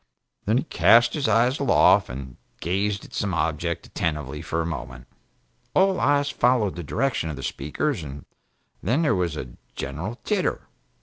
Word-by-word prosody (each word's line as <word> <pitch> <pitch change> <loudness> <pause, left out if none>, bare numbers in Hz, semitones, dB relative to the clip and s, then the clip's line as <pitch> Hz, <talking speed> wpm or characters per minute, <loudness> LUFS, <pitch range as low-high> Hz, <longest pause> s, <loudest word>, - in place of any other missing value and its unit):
Then 110 +4 +2
he - - +1
cast 120 -6 +5
his 145 -5 0
eyes 120 +5 +3
aloft 140 - +4
and 65 0 -7 0.2
gazed 100 +4 -1
at - - -16
some 100 -3 -1
object 80 +1 -1
attentively 75 -2 -3
for 80 +1 -3
a 80 - 0
moment. 65 -6 -6 0.7
All 190 0 +4
eyes 145 0 +2
followed 120 -8 +2
the 90 - -5
direction 115 - -1
of 75 - -4
the 70 - -8
Speaker's, 90 - -2
and 70 -1 -8 0.6
then 135 +8 +1
there 150 - +3
was 85 -4 -1
a 60 -4 -7 0.2
general 95 +9 -4
titter. 205 -4 0
95 Hz, 165 wpm, -24 LUFS, 75-125 Hz, 0.7 s, cast